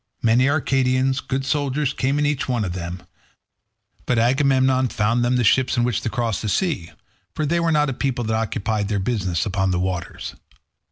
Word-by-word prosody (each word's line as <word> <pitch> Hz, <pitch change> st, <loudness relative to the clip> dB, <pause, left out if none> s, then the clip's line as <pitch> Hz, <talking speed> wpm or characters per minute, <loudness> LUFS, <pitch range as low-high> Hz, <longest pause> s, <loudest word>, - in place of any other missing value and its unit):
Many 120 Hz, +4 st, +4 dB
Arcadians, 135 Hz, -2 st, +1 dB
good 135 Hz, 0 st, -3 dB
soldiers, 145 Hz, -1 st, 0 dB
came 135 Hz, +2 st, 0 dB
in 145 Hz, -, +1 dB
each 145 Hz, -2 st, -1 dB
one 120 Hz, -4 st, 0 dB
of 90 Hz, -, -3 dB
them, 90 Hz, 0 st, -6 dB, 1.0 s
but 125 Hz, -, +1 dB
Agamemnon 130 Hz, +1 st, +3 dB
found 115 Hz, +1 st, 0 dB
them 120 Hz, +1 st, +2 dB
the 125 Hz, -, +2 dB
ships 130 Hz, +2 st, +3 dB
in 120 Hz, -, +3 dB
which 120 Hz, -5 st, 0 dB
to -, -, -2 dB
cross 115 Hz, -3 st, -2 dB
the 110 Hz, -, -2 dB
sea, 140 Hz, -, -1 dB, 0.5 s
for 155 Hz, -, -1 dB
they 170 Hz, +4 st, +1 dB
were 170 Hz, -1 st, +1 dB
not 150 Hz, -1 st, +3 dB
a -, -, -3 dB
people 125 Hz, -1 st, -2 dB
that 110 Hz, 0 st, -1 dB
occupied 110 Hz, -1 st, -1 dB
their 105 Hz, 0 st, -1 dB
business 95 Hz, -5 st, -1 dB
upon 95 Hz, -2 st, 0 dB
the 90 Hz, -1 st, 0 dB
waters. 90 Hz, -1 st, -4 dB
125 Hz, 190 wpm, -22 LUFS, 105-135 Hz, 1.0 s, Many